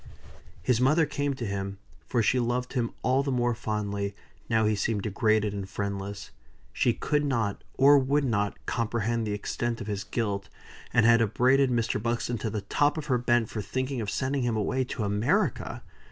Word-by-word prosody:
His 125 -2 +2
mother 150 +5 +4
came 145 -1 -2
to 120 - -4
him; 100 -1 -3 0.3
for 120 -2 +1
she 125 +4 +3
loved 125 +1 -1
him 120 -3 0
all 130 +2 +3
the 140 0 -2
more 120 -1 +1
fondly, 100 -3 -3 0.3
now 110 -2 +3
he 105 0 +2
seemed 105 0 -1
degraded 110 0 +1
and 100 -2 -5
friendless. 100 0 -4 0.4
She - - +2
could 150 0 0
not, 115 -8 -1
or 140 +2 +7
would 140 +2 +1
not, 105 -6 0
comprehend 115 -1 -1
the 105 - -1
extent 115 +3 -2
of 115 - -5
his 100 -1 -3
guilt; 100 -2 -2 0.4
and 115 - +4
had 115 0 +6
upbraided 130 +5 +3
Mr. 115 -3 0
Buxton 120 0 -1
to 110 - -2
the 105 0 -3
top 145 - +1
of 155 - -4
her 125 - +2
bent 120 -1 +2
for 110 - -3
thinking 130 +5 -2
of 105 - -3
sending 135 +5 -1
him 120 -2 0
away 130 +5 0
to 120 - -4
America. 105 +2 0
115 Hz, 185 wpm, -28 LUFS, 105-130 Hz, 0.4 s, or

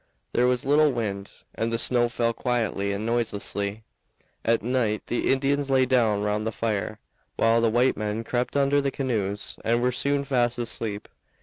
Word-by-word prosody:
There 125 - +3
was 125 +2 0
little 150 +2 +4
wind, 100 -5 -3 0.2
and 115 +1 -2
the 115 - 0
snow 120 0 +2
fell 115 -1 0
quietly 115 -5 -1
and 100 +2 -3
noiselessly. 105 -2 -1 0.6
At 115 -2 +2
night 115 -3 0
the 120 - 0
Indians 140 +1 +1
lay 130 -1 +4
down 115 -5 +2
round 105 +1 -1
the - - -1
fire, 110 -1 -2 0.4
while 115 +1 +3
the 115 - +3
white 120 +3 +3
men 105 +1 -3
crept 125 +4 -1
under 140 +1 +3
the 140 - 0
canoes 105 -8 -3
and 115 +1 +2
were 125 +1 +1
soon 140 +2 0
fast 125 -3 +1
asleep. 110 -3 -4
115 Hz, 175 wpm, -25 LUFS, 110-130 Hz, 0.6 s, little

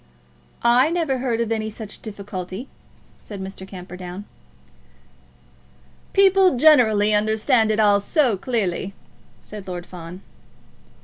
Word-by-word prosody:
"I 245 +5 +5
never 325 -6 -1
heard 240 -3 -1
of 230 -1 -2
any 220 -1 -1
such 215 -1 -9
difficulty," 200 +1 -7 0.5
said 205 -2 -9
Mr. 190 0 -8
Camperdown. 180 +1 -9 1.9
"People 385 -5 +4
generally 220 -8 +5
understand 220 +2 +2
it 215 0 0
all 205 -1 +4
so 250 - +1
clearly," 200 -3 -2 0.4
said 210 -2 -10
Lord 175 -1 -6
Fawn. 180 +1 -10
215 Hz, 110 wpm, -22 LUFS, 190-245 Hz, 1.9 s, I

